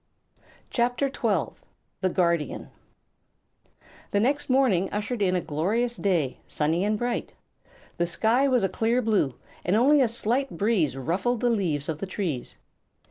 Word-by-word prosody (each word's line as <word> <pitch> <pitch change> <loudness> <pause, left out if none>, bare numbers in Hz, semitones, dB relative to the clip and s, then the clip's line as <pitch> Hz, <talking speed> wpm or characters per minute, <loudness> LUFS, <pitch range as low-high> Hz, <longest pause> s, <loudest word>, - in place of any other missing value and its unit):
[CHAPTER 245 +3 +1
XII] - - -1 0.4
The 185 - +2
Guardian 170 -6 0 1.4
The 200 - +1
next 275 +7 0
morning 245 -9 +3
ushered 210 +2 -3
in 185 -2 +2
a 180 - +1
glorious 215 +12 0
day, 170 - 0
sunny 160 +4 0
and 210 +1 +1
bright. 240 +2 -3 0.6
The 175 - +1
sky 230 +9 +2
was 250 -5 +2
a - - +3
clear 230 +5 0
blue, 200 - +1 0.3
and 180 - +1
only 275 +6 +5
a 255 - +4
slight 235 +4 -1
breeze 195 - +1
ruffled 185 - -1
the 245 - +2
leaves 165 -10 -1
of 155 -2 -3
the 195 - -4
trees. 175 -10 -4
205 Hz, 145 wpm, -26 LUFS, 170-240 Hz, 1.4 s, only